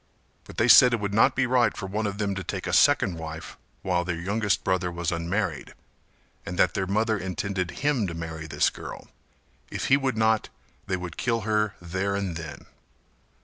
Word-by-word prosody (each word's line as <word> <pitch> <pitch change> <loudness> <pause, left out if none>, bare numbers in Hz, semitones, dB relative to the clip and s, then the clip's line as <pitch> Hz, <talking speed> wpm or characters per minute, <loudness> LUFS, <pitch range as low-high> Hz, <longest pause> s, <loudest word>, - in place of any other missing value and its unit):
But - - -13
they - - +3
said 125 -1 +8
that - - +5
it - - -5
would 100 -1 -3
not 120 +5 +4
be 130 - +2
right 125 -2 +2
for - - -5
one 105 +3 -2
of 100 0 -4
them 100 -2 -1
to 100 0 -4
take 95 +1 -4
a 90 - -3
second 100 - +4
wife 80 0 -7 0.3
while 90 -2 +1
their 85 -2 -3
youngest 100 +3 0
brother 90 -1 0
was 85 -1 -2
unmarried, 85 -1 -2 0.7
and 90 - -6
that 90 - +3
their 95 -2 -2
mother 110 +2 +1
intended 95 0 -3
him 135 -5 0
to 85 - -5
marry 80 -1 -6
this - - +1
girl; - - -9 0.6
if - - -3
he 135 - +6
would 135 -4 -1
not 110 -1 +2 0.4
they 95 - 0
would 90 -2 -7
kill 115 -2 0
her 105 -1 0
there 95 +3 -2
and 100 -4 -2
then. 80 -2 -8
100 Hz, 200 wpm, -26 LUFS, 85-110 Hz, 0.7 s, said